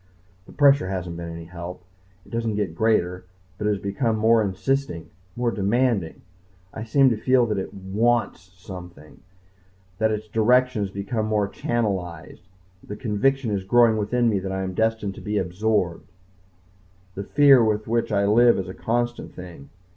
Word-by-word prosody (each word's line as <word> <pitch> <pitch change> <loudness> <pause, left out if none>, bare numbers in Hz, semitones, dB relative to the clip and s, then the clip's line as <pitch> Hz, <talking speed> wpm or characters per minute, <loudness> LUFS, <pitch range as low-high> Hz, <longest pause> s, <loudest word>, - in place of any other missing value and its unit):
The - - -13
pressure 140 -7 +4
hasn't 90 -3 -4
been 85 0 -6
any 85 0 -8
help. 90 +1 -8 0.4
It - - -18
doesn't 115 -2 -2
get 100 -6 -2
greater, 90 -2 0 0.3
but 105 - -1
it - - +2
has 105 - +1
become 110 +4 -1
more 110 +1 +4
insisting 105 -1 -2 0.2
more 120 -1 0
demanding. 105 -3 0 0.5
I 110 - -6
seem 130 +3 +4
to 115 - 0
feel 125 +2 +3
that 105 -3 -1
it 95 - -5
wants 105 +4 0 0.2
something, 90 -5 -11 0.8
that 110 0 +2
its 110 0 -3
direction 125 +2 +2
has 100 - -2
become 105 +3 -3
more 105 -2 +1
channelized. 95 -7 -3 0.4
The 105 - -7
conviction 120 +3 0
is 100 -2 -2
growing 115 +3 +4
within 120 +3 +1
me 105 -4 +1
that 95 0 -5
I 95 0 -2
am 95 0 -4
destined 110 -1 0
to - - -11
be 105 0 -2
absorbed. 95 -1 -1 1.0
The 100 - -5
fear 140 +1 +5
with 110 -1 0
which 115 0 0
I 100 -1 +2
live 120 +3 +5
is 95 -1 -3
a 95 - -7
constant 120 +3 -3
thing. 85 -6 -11
105 Hz, 170 wpm, -23 LUFS, 95-115 Hz, 1.0 s, fear